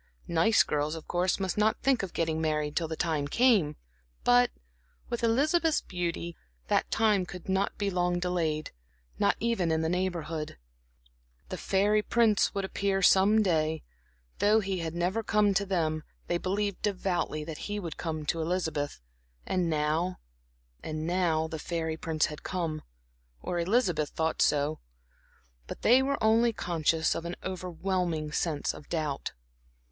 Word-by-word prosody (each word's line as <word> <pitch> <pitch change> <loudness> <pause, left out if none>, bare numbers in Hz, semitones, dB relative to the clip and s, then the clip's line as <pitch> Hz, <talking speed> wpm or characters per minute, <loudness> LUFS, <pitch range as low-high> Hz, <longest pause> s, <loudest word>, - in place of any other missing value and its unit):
Nice 170 +7 +4
girls, 150 +1 -1
of 160 - -9
course, 180 +2 +1
must 190 +1 -1
not 215 +1 +2
think 270 -3 +3
of 190 -3 -4
getting 160 -1 0
married 150 -2 -1
till 165 - 0
the 160 - -4
time 155 -4 -1
came, 200 - +3 0.5
but 245 0 +5 0.6
with 235 0 -2
Elizabeth's 305 +8 +3
beauty, 170 -1 -3 0.3
that - - +2
time 215 -4 +3
could 180 0 -9
not 190 +1 0
be 200 -1 -1
long 180 -1 +1
delayed, 165 -4 -1 0.5
not - - +3
even 225 -8 +1
in 160 0 +1
the 160 - 0
Neighborhood. 170 - -2 0.9
The - - -4
fairy 205 +2 +2
prince 220 -1 +3
would 195 -1 -1
appear 195 0 -1
some 205 +4 +5
day; 160 -4 +1 0.6
though 210 +2 +5
he 195 -3 -2
had 165 -1 -4
never 180 +6 0
come 210 -2 +2
to 200 +1 0
them, 160 -5 0 0.2
they 175 - -1
believed 200 +1 -1
devoutly 185 -6 -1
that 155 0 -7
he 205 0 -2
would 170 -6 -5
come 155 -2 -4
to 165 +2 -1
Elizabeth. 160 -4 -2 0.5
And 180 -2 0
now 160 +4 0 0.6
and 155 0 -4
now 170 -2 +1
the 160 0 -6
fairy 160 -1 -2
prince 160 -1 0
had 150 - -6
come, 165 -4 -3 0.6
or 175 - -3
Elizabeth 175 - +1
thought 160 0 -1
so; 150 +1 +2 0.9
but - - -8
they 250 +3 +6
were 280 +1 0
only 225 +2 +4
conscious 165 -3 +1
of - - -4
an 170 +1 -4
overwhelming 180 -3 -2
sense 150 -1 -1
of 145 - -13
doubt. 155 -5 -2
175 Hz, 155 wpm, -29 LUFS, 160-200 Hz, 0.9 s, they